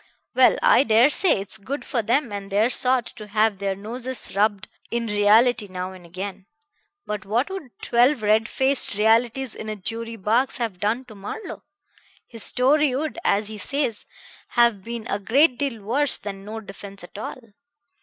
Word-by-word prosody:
Well, -, -, +5 dB
I -, -, +6 dB
dare 230 Hz, +2 st, +5 dB
say 365 Hz, -, +4 dB
it's 200 Hz, +3 st, -4 dB
good 275 Hz, +8 st, -5 dB
for 250 Hz, -4 st, -1 dB
them 240 Hz, +3 st, 0 dB
and 200 Hz, -1 st, -6 dB
their 215 Hz, +5 st, +2 dB
sort 255 Hz, -1 st, +2 dB
to 215 Hz, -2 st, -9 dB
have 210 Hz, -1 st, +1 dB
their 195 Hz, -1 st, -1 dB
noses 240 Hz, +4 st, -5 dB
rubbed 205 Hz, -1 st, +1 dB, 0.2 s
in 235 Hz, 0 st, -2 dB
reality 210 Hz, +2 st, +3 dB
now 185 Hz, 0 st, -5 dB
and 180 Hz, -2 st, -13 dB
again. 190 Hz, +2 st, -7 dB, 0.6 s
But 210 Hz, 0 st, -4 dB
what 235 Hz, -, -1 dB
would 380 Hz, -9 st, -6 dB
twelve 245 Hz, +1 st, +3 dB
red 215 Hz, +1 st, +3 dB
faced 265 Hz, -5 st, +2 dB
realities 230 Hz, +4 st, +2 dB
in 215 Hz, -, -7 dB
a 215 Hz, -, -3 dB
jury 230 Hz, +3 st, -5 dB
box 225 Hz, +6 st, +1 dB
have 225 Hz, -7 st, -3 dB
done 225 Hz, +6 st, -1 dB
to 235 Hz, -, -13 dB
Marlowe? 215 Hz, -, -7 dB, 0.6 s
His 230 Hz, -2 st, -10 dB
story 275 Hz, +1 st, +3 dB
would, 310 Hz, +4 st, -3 dB
as 210 Hz, +1 st, +1 dB
he 215 Hz, -1 st, -8 dB
says, 270 Hz, -1 st, -2 dB, 0.4 s
have 235 Hz, -5 st, +2 dB
been 230 Hz, 0 st, -6 dB
a 205 Hz, -, -2 dB
great 250 Hz, +6 st, +3 dB
deal 250 Hz, -7 st, -3 dB
worse 275 Hz, +7 st, +2 dB
than 195 Hz, -1 st, -8 dB
no 220 Hz, +1 st, -6 dB
defense 200 Hz, -1 st, -10 dB
at 180 Hz, -, -10 dB
all. 240 Hz, -, -6 dB
225 Hz, 175 wpm, -23 LUFS, 205-250 Hz, 0.6 s, I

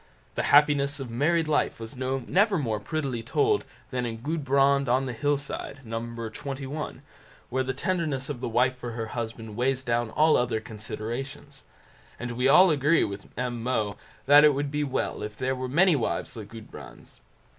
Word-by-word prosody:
The -, -, -1 dB
happiness 145 Hz, -1 st, +4 dB
of 130 Hz, -4 st, -6 dB
married 160 Hz, +7 st, +2 dB
life 150 Hz, -5 st, +1 dB
was 115 Hz, +1 st, -7 dB
never 135 Hz, -, +1 dB
more 115 Hz, -8 st, -1 dB
prettily 135 Hz, 0 st, -3 dB
told 420 Hz, -, +1 dB, 0.3 s
than 125 Hz, -1 st, -1 dB
in 115 Hz, -2 st, -3 dB
"Gudbrand 140 Hz, -3 st, +2 dB
on 130 Hz, +2 st, +2 dB
the 125 Hz, -, -3 dB
Hillside", 140 Hz, +1 st, -2 dB
No. 115 Hz, 0 st, -3 dB
xxi, 130 Hz, +5 st, -5 dB, 0.5 s
where 130 Hz, +1 st, +1 dB
the 130 Hz, 0 st, -2 dB
tenderness 150 Hz, -5 st, -1 dB
of 140 Hz, -5 st, -5 dB
the 125 Hz, -, -2 dB
wife 125 Hz, +3 st, +2 dB
for 120 Hz, -2 st, -6 dB
her 115 Hz, -1 st, -4 dB
husband 115 Hz, -2 st, -5 dB
weighs 130 Hz, +2 st, 0 dB
down 120 Hz, -2 st, 0 dB
all 155 Hz, +6 st, +4 dB
other 120 Hz, -2 st, 0 dB
considerations; 120 Hz, +6 st, -7 dB, 0.6 s
and 125 Hz, 0 st, -4 dB
we 125 Hz, +2 st, +1 dB
all 180 Hz, +6 st, +7 dB
agree 150 Hz, +2 st, +3 dB
with 100 Hz, -1 st, -5 dB
M. 120 Hz, -1 st, -2 dB
Moe 110 Hz, -4 st, -1 dB, 0.3 s
that 145 Hz, +2 st, +8 dB
it 150 Hz, -2 st, +6 dB
would 140 Hz, 0 st, -2 dB
be 150 Hz, 0 st, 0 dB
well 135 Hz, -3 st, -2 dB
if 105 Hz, 0 st, -6 dB
there 130 Hz, 0 st, 0 dB
were 130 Hz, 0 st, -4 dB
many 170 Hz, +5 st, +5 dB
wives 120 Hz, -, -2 dB
like 110 Hz, -3 st, -7 dB
Gudbrand's. 110 Hz, 0 st, -12 dB
130 Hz, 175 wpm, -27 LUFS, 115-145 Hz, 0.6 s, that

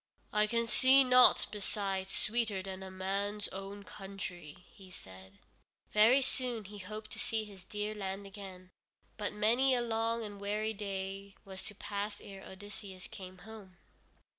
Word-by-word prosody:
"I 210 Hz, 0 st, +4 dB
can 230 Hz, +1 st, +2 dB
see 260 Hz, +4 st, +7 dB
nought 250 Hz, -1 st, +7 dB
beside 195 Hz, -2 st, -1 dB
sweeter 210 Hz, -1 st, 0 dB
than 190 Hz, 0 st, -6 dB
a 190 Hz, -, -6 dB
man's 200 Hz, +2 st, -1 dB
own 195 Hz, +1 st, -6 dB
country," 190 Hz, -5 st, -7 dB
he 190 Hz, -2 st, -13 dB
said. 95 Hz, -, -12 dB, 0.6 s
Very 230 Hz, +6 st, +7 dB
soon 250 Hz, -4 st, -1 dB
he 205 Hz, +1 st, -8 dB
hoped 215 Hz, +3 st, -7 dB
to -, -, -6 dB
see 220 Hz, -1 st, 0 dB
his 200 Hz, -3 st, -11 dB
dear 210 Hz, +1 st, -2 dB
land 195 Hz, -1 st, -4 dB
again, 190 Hz, -2 st, -9 dB, 0.5 s
but 205 Hz, -1 st, -1 dB
many 235 Hz, +6 st, +4 dB
a 245 Hz, -, +2 dB
long 230 Hz, 0 st, 0 dB
and 205 Hz, -2 st, -7 dB
weary 210 Hz, +2 st, 0 dB
day 195 Hz, -1 st, -4 dB
was 190 Hz, -1 st, -7 dB
to 210 Hz, -, -7 dB
pass 205 Hz, 0 st, -3 dB
ere 195 Hz, -1 st, -9 dB
Odysseus 195 Hz, -1 st, -8 dB
came 185 Hz, -1 st, -9 dB
home. 210 Hz, -5 st, -11 dB
205 Hz, 155 wpm, -34 LUFS, 190-215 Hz, 0.6 s, see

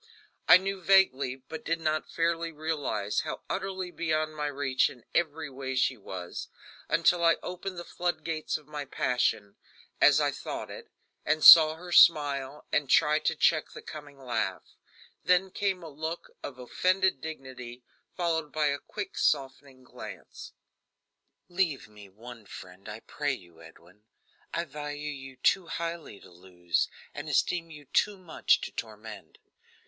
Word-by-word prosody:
I -, -, +10 dB
knew 195 Hz, +1 st, -4 dB
vaguely 165 Hz, -9 st, +4 dB
but 135 Hz, +5 st, -10 dB
did 165 Hz, +1 st, -1 dB
not 155 Hz, -1 st, -1 dB
fairly 165 Hz, 0 st, -1 dB
realize 150 Hz, -10 st, -2 dB
how -, -, -4 dB
utterly 190 Hz, -2 st, -3 dB
beyond 155 Hz, -2 st, -1 dB
my 150 Hz, -1 st, -2 dB
reach 140 Hz, -2 st, +1 dB
in 125 Hz, -, -15 dB
every 160 Hz, -2 st, 0 dB
way 130 Hz, -1 st, -5 dB
she 130 Hz, +1 st, +2 dB
was 95 Hz, -5 st, -7 dB, 0.4 s
until 175 Hz, -1 st, +3 dB
I 165 Hz, 0 st, +5 dB
opened 180 Hz, +1 st, -6 dB
the 175 Hz, -, -5 dB
flood 175 Hz, 0 st, -3 dB
gates 160 Hz, -2 st, -2 dB
of 155 Hz, -, -17 dB
my 150 Hz, 0 st, -5 dB
passion 125 Hz, -6 st, -1 dB, 0.4 s
as -, -, +7 dB
I -, -, +2 dB
thought -, -, -6 dB
it -, -, -10 dB, 0.3 s
and 155 Hz, +1 st, 0 dB
saw 155 Hz, -1 st, +11 dB
her 175 Hz, +2 st, -10 dB
smile, 145 Hz, -4 st, +4 dB
and 145 Hz, -3 st, +1 dB
try 150 Hz, +1 st, +4 dB
to 160 Hz, -, 0 dB
check 155 Hz, 0 st, +2 dB
the -, -, -10 dB
coming 145 Hz, -2 st, -10 dB
laugh. 130 Hz, -3 st, -3 dB, 0.5 s
Then 180 Hz, +1 st, +3 dB
came 190 Hz, -3 st, -1 dB
a -, -, -7 dB
look 160 Hz, +3 st, -6 dB
of 130 Hz, -, -7 dB
offended 185 Hz, +5 st, +1 dB
dignity, 130 Hz, -5 st, -8 dB, 0.3 s
followed 160 Hz, -4 st, -1 dB
by 150 Hz, 0 st, +1 dB
a 140 Hz, 0 st, -1 dB
quick 200 Hz, +4 st, -7 dB
softening 135 Hz, -2 st, -1 dB
glance. -, -, -10 dB, 0.9 s
"Leave 175 Hz, -6 st, -1 dB
me 105 Hz, -2 st, -14 dB
one 115 Hz, +2 st, -12 dB
friend, 90 Hz, +3 st, -11 dB
I 110 Hz, +1 st, -8 dB
pray 145 Hz, -1 st, -2 dB
you, 85 Hz, -8 st, -12 dB
Edwin. 85 Hz, +5 st, -17 dB, 0.5 s
I 170 Hz, -, -2 dB
value 150 Hz, 0 st, -5 dB
you 135 Hz, -2 st, -9 dB
too 170 Hz, +8 st, +2 dB
highly 165 Hz, -11 st, -5 dB
to -, -, -16 dB
lose, 90 Hz, -1 st, -2 dB, 0.3 s
and 145 Hz, +1 st, -6 dB
esteem 165 Hz, +4 st, +1 dB
you 150 Hz, -2 st, -12 dB
too 205 Hz, +9 st, +1 dB
much 180 Hz, -4 st, +1 dB
to -, -, -5 dB
torment. 110 Hz, -2 st, -9 dB
150 Hz, 155 wpm, -29 LUFS, 130-165 Hz, 0.9 s, saw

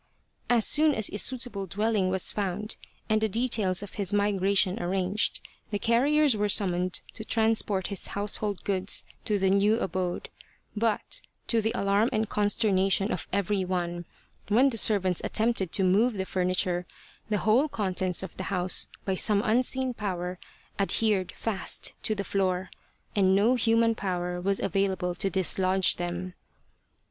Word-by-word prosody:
As 235 Hz, -3 st, +4 dB
soon 305 Hz, -1 st, +5 dB
as 220 Hz, -, +2 dB
a 205 Hz, -, -1 dB
suitable 235 Hz, -6 st, +1 dB
dwelling 205 Hz, 0 st, 0 dB
was 190 Hz, 0 st, 0 dB
found 205 Hz, +1 st, -3 dB, 0.3 s
and 215 Hz, -1 st, +1 dB
the 220 Hz, -, +1 dB
details 210 Hz, -4 st, +1 dB
of 205 Hz, -, -10 dB
his 195 Hz, -, 0 dB
migration 200 Hz, -2 st, +2 dB
arranged, 185 Hz, +3 st, -1 dB, 0.3 s
the 205 Hz, -, -2 dB
carriers 275 Hz, +5 st, +3 dB
were 210 Hz, 0 st, 0 dB
summoned 180 Hz, -2 st, +2 dB
to 220 Hz, -, -7 dB
transport 220 Hz, -4 st, +1 dB
his 200 Hz, -3 st, -2 dB
household 205 Hz, -1 st, -2 dB
goods 190 Hz, -1 st, 0 dB, 0.2 s
to 210 Hz, -, 0 dB
the 190 Hz, -1 st, +1 dB
new 205 Hz, +3 st, +3 dB
abode, 185 Hz, -4 st, -3 dB, 0.5 s
but 220 Hz, 0 st, -1 dB, 0.3 s
to 230 Hz, -2 st, +2 dB
the 220 Hz, +1 st, 0 dB
alarm 200 Hz, +3 st, +1 dB
and 220 Hz, -3 st, -1 dB
consternation 200 Hz, -1 st, +1 dB
of 180 Hz, -, -4 dB
every 200 Hz, 0 st, 0 dB
one, 175 Hz, -1 st, -3 dB, 0.4 s
when 250 Hz, +6 st, +3 dB
the 230 Hz, -, 0 dB
servants 190 Hz, -5 st, +2 dB
attempted 220 Hz, -5 st, 0 dB
to 195 Hz, -, +2 dB
move 210 Hz, +7 st, +3 dB
the 190 Hz, -2 st, -3 dB
furniture, 180 Hz, -1 st, -1 dB, 0.4 s
the 210 Hz, -, +1 dB
whole 230 Hz, +9 st, +2 dB
contents 185 Hz, -5 st, -1 dB
of 190 Hz, -, -8 dB
the 185 Hz, -, -5 dB
house 180 Hz, -1 st, 0 dB, 0.2 s
by 190 Hz, -, 0 dB
some 200 Hz, +2 st, +3 dB
unseen 255 Hz, +3 st, 0 dB
power 185 Hz, -5 st, -4 dB, 0.4 s
adhered 200 Hz, -1 st, +1 dB
fast 215 Hz, -4 st, -1 dB
to 215 Hz, -, 0 dB
the 200 Hz, -, -3 dB
floor, 185 Hz, -2 st, -1 dB, 0.4 s
and 190 Hz, -2 st, +3 dB
no 215 Hz, +5 st, +3 dB
human 230 Hz, -1 st, +2 dB
power 180 Hz, -3 st, -3 dB
was 195 Hz, +1 st, 0 dB
available 190 Hz, -2 st, -1 dB
to 195 Hz, +2 st, -1 dB
dislodge 190 Hz, 0 st, +1 dB
them. 175 Hz, +1 st, -4 dB
200 Hz, 155 wpm, -27 LUFS, 185-220 Hz, 0.5 s, soon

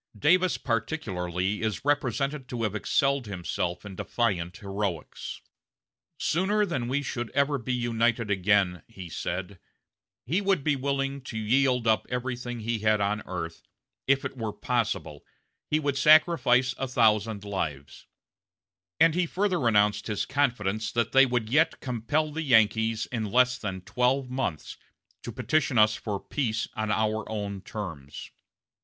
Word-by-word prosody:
Davis 180 Hz, -, +3 dB
particularly 100 Hz, -, -2 dB
is 110 Hz, +2 st, -2 dB
represented 140 Hz, -1 st, 0 dB
to 120 Hz, -2 st, -3 dB
have 105 Hz, -3 st, 0 dB
excelled 135 Hz, +4 st, +1 dB
himself 90 Hz, -1 st, -3 dB
in 100 Hz, -2 st, -8 dB
defiant 95 Hz, -5 st, -1 dB
heroics. 100 Hz, -5 st, -4 dB, 0.8 s
"Sooner 205 Hz, +5 st, +1 dB
than 130 Hz, -11 st, -2 dB
we 140 Hz, +3 st, 0 dB
should 120 Hz, -4 st, -4 dB
ever 140 Hz, 0 st, +2 dB
be 125 Hz, +2 st, -2 dB
united 115 Hz, -2 st, 0 dB
again," 95 Hz, -2 st, +2 dB
he 95 Hz, -6 st, -10 dB
said, 90 Hz, +3 st, -4 dB, 0.7 s
"he 170 Hz, +11 st, 0 dB
would 195 Hz, -7 st, +1 dB
be 145 Hz, -1 st, +2 dB
willing 135 Hz, 0 st, -2 dB
to 115 Hz, -, -6 dB
yield 125 Hz, +2 st, +2 dB
up 110 Hz, -1 st, +2 dB
everything 120 Hz, -1 st, -4 dB
he 115 Hz, +1 st, -1 dB
had 110 Hz, 0 st, +2 dB
on 105 Hz, +2 st, 0 dB
earth 85 Hz, -3 st, -5 dB, 0.5 s
if 135 Hz, 0 st, +2 dB
it -, -, -4 dB
were 115 Hz, -4 st, -3 dB
possible, 115 Hz, -, -2 dB, 0.5 s
he 155 Hz, -, +2 dB
would 140 Hz, -2 st, -1 dB
sacrifice 145 Hz, -5 st, +5 dB
a 135 Hz, -, -1 dB
thousand 110 Hz, -3 st, +2 dB
lives"; 80 Hz, -9 st, -5 dB, 0.9 s
and 165 Hz, 0 st, +6 dB
he 175 Hz, 0 st, +1 dB
further 180 Hz, -8 st, 0 dB
announced 105 Hz, -2 st, +3 dB
his 105 Hz, -2 st, -1 dB
confidence 110 Hz, -6 st, 0 dB
that 115 Hz, -2 st, 0 dB
they 135 Hz, 0 st, +6 dB
would 120 Hz, -3 st, -1 dB
yet 155 Hz, +7 st, +2 dB
"compel 140 Hz, +5 st, -1 dB
the 160 Hz, +2 st, -3 dB
Yankees, 110 Hz, -4 st, +3 dB
in 115 Hz, -3 st, -2 dB
less 125 Hz, 0 st, +3 dB
than 95 Hz, -3 st, -4 dB
twelve 125 Hz, +7 st, 0 dB
months, 125 Hz, -, -3 dB, 0.4 s
to -, -, -6 dB
petition 155 Hz, -5 st, 0 dB
us 110 Hz, 0 st, +6 dB
for 105 Hz, -3 st, -4 dB
peace 115 Hz, -4 st, -2 dB
on 110 Hz, -1 st, -2 dB
our 110 Hz, 0 st, 0 dB
own 100 Hz, -3 st, -4 dB
terms." 80 Hz, -10 st, -7 dB
115 Hz, 145 wpm, -27 LUFS, 105-135 Hz, 0.9 s, and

